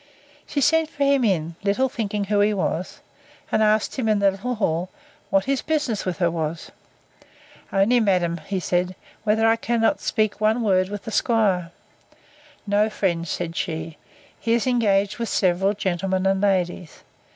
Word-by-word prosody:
She 285 Hz, -, -1 dB
sent 320 Hz, +2 st, +3 dB
for 290 Hz, -3 st, -2 dB
him 280 Hz, -2 st, +3 dB
in, 170 Hz, -6 st, 0 dB
little 205 Hz, +7 st, +2 dB
thinking 215 Hz, -6 st, -3 dB
who 205 Hz, +1 st, 0 dB
he 205 Hz, +1 st, +3 dB
was, 185 Hz, -2 st, -3 dB, 0.5 s
and -, -, +2 dB
asked 215 Hz, +2 st, +2 dB
him, 225 Hz, -3 st, 0 dB
in 215 Hz, -, +3 dB
the 200 Hz, -1 st, +3 dB
little 235 Hz, +6 st, -4 dB
hall, 180 Hz, -4 st, -1 dB, 0.4 s
what 195 Hz, -1 st, +2 dB
his 275 Hz, -1 st, 0 dB
business 295 Hz, -9 st, -1 dB
with 180 Hz, -, -2 dB
her 175 Hz, -2 st, +1 dB
was?—Only, 170 Hz, +6 st, -3 dB
madam, 180 Hz, -5 st, +1 dB, 0.2 s
said 180 Hz, 0 st, 0 dB
he, 185 Hz, -, -11 dB, 0.3 s
whether 220 Hz, +1 st, +3 dB
I 225 Hz, 0 st, +4 dB
cannot 230 Hz, 0 st, +1 dB
speak 215 Hz, -1 st, -1 dB
one 220 Hz, +2 st, +2 dB
word 185 Hz, -3 st, +2 dB
with 205 Hz, 0 st, -6 dB
the 225 Hz, -, -6 dB
'squire? 200 Hz, -8 st, +1 dB, 1.0 s
No, 205 Hz, +1 st, +2 dB
friend, 175 Hz, -5 st, -1 dB
said 170 Hz, +1 st, -4 dB
she; 160 Hz, -2 st, -4 dB, 0.4 s
he 230 Hz, -, 0 dB
is 235 Hz, +1 st, +1 dB
engaged 205 Hz, -5 st, +1 dB
with 230 Hz, -, -2 dB
several 190 Hz, +1 st, +2 dB
gentlemen 190 Hz, 0 st, -1 dB
and 195 Hz, 0 st, +2 dB
ladies. 180 Hz, -4 st, -1 dB
200 Hz, 160 wpm, -23 LUFS, 180-225 Hz, 1.0 s, I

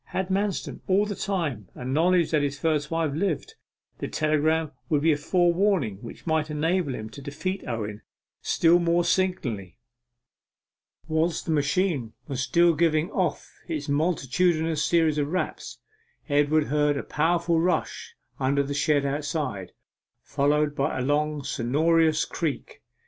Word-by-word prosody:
Had 190 Hz, 0 st, -3 dB
Manston, 195 Hz, +1 st, -1 dB
all 195 Hz, +2 st, +3 dB
the 205 Hz, -, -3 dB
time, 160 Hz, -, -3 dB
a 125 Hz, -, -8 dB
knowledge 165 Hz, +5 st, +2 dB
that 155 Hz, -2 st, +3 dB
his 145 Hz, 0 st, -2 dB
first 150 Hz, -2 st, 0 dB
wife 165 Hz, -3 st, -1 dB
lived, 160 Hz, 0 st, -2 dB, 0.5 s
the -, -, -3 dB
telegram 155 Hz, 0 st, +1 dB, 0.2 s
would 150 Hz, -3 st, +1 dB
be 165 Hz, -, +5 dB
a -, -, +3 dB
forewarning 175 Hz, -, +1 dB
which 115 Hz, +3 st, -11 dB
might 160 Hz, -2 st, 0 dB
enable 155 Hz, -1 st, 0 dB
him 110 Hz, -, -6 dB
to 140 Hz, -, -10 dB
defeat 150 Hz, +7 st, -4 dB
Owen 110 Hz, -3 st, -4 dB, 0.4 s
still 170 Hz, +1 st, +4 dB
more 170 Hz, 0 st, +2 dB
signally. 135 Hz, -, -1 dB, 1.3 s
Whilst 160 Hz, +1 st, 0 dB
the -, -, -2 dB
machine 145 Hz, -, 0 dB
was 135 Hz, -3 st, -3 dB
still 170 Hz, +5 st, +4 dB
giving 160 Hz, +2 st, +1 dB
off 180 Hz, -8 st, -1 dB, 0.2 s
its 155 Hz, -3 st, -3 dB
multitudinous 160 Hz, +1 st, +1 dB
series 160 Hz, -3 st, +2 dB
of 145 Hz, -, 0 dB
raps, 185 Hz, +4 st, -3 dB, 0.5 s
Edward 150 Hz, +1 st, +3 dB
heard 150 Hz, 0 st, +1 dB
a -, -, -3 dB
powerful 170 Hz, +2 st, +1 dB
rush 175 Hz, +2 st, -1 dB, 0.2 s
under 140 Hz, +2 st, +2 dB
the 140 Hz, +1 st, -4 dB
shed 145 Hz, 0 st, +2 dB
outside, 140 Hz, -, -3 dB, 0.5 s
followed 145 Hz, +1 st, +1 dB
by 140 Hz, 0 st, -1 dB
a 130 Hz, -, -1 dB
long 150 Hz, +1 st, 0 dB
sonorous 155 Hz, +5 st, +2 dB
creak. 160 Hz, -5 st, -4 dB
155 Hz, 145 wpm, -26 LUFS, 140-170 Hz, 1.3 s, be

